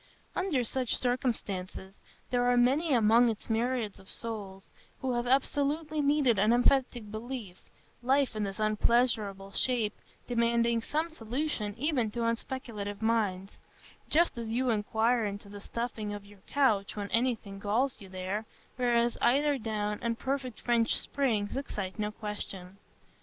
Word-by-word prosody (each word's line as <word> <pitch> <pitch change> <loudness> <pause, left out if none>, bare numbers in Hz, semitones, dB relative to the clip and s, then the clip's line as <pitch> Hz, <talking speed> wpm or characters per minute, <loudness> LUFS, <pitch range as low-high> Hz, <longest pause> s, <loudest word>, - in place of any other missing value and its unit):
Under 360 -9 +1
such 250 +1 -1
circumstances, 205 -7 -2 0.4
there 245 0 +3
are 245 - +4
many 275 +7 +3
among 235 0 +5
its 225 +1 -4
myriads 230 -2 0
of 190 - -15
souls 200 -4 -5 0.3
who 260 -1 -1
have 240 0 -1
absolutely 290 +4 +1
needed 280 -6 +3
an 210 +3 +4
emphatic 245 -3 +2
belief, 220 -4 -6 0.4
life 270 0 +2
in 215 - -2
this 200 0 -3
unpleasurable 215 -2 +1
shape 230 -1 +1 0.3
demanding 235 -1 +2
some 310 +7 -1
solution 235 -5 -2
even 260 -4 +1
to 235 +3 -4
unspeculative 225 -3 -3
minds,—just 225 - -1
as 230 -1 -4
you 245 +2 +1
inquire 225 +2 +2
into 200 0 -4
the 205 0 -9
stuffing 220 -2 -4
of 205 -1 -9
your 200 -1 -17
couch 220 -8 +2
when 205 -1 -4
anything 230 -5 0
galls 225 +7 0
you 195 - -11
there, 190 +4 -3 0.3
whereas 240 -1 +2
eider 280 +3 +3
down 210 -2 -2
and 230 -1 -1
perfect 260 -3 -3
French 235 -1 +2
springs 230 -8 0
excite 210 -8 -4
no 210 0 -1
question. 200 -3 -7
230 Hz, 140 wpm, -30 LUFS, 210-255 Hz, 0.4 s, among